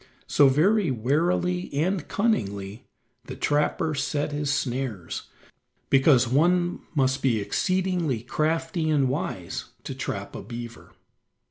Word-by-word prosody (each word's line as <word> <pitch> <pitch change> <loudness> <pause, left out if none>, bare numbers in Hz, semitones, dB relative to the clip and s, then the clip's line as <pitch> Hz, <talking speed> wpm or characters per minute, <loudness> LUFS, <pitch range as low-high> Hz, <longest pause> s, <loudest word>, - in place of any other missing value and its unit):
So, 140 -2 +5
very 185 +7 +3
warily 170 +9 0
and 170 +3 0
cunningly, 100 - -1 0.4
the - - -7
trapper 150 +2 0
set 145 +1 -1
his 145 0 -1
snares, 125 -9 -3 0.6
because 135 -2 +5
one 175 +7 +2 0.2
must 130 -1 +2
be 120 -5 +2
exceedingly 175 - 0
crafty 160 +4 -1
and 140 -4 +3
wise 130 - -3 0.2
to - - -5
trap - - -5
a - - -6
beaver. 120 0 -9
145 Hz, 115 wpm, -26 LUFS, 130-170 Hz, 0.6 s, So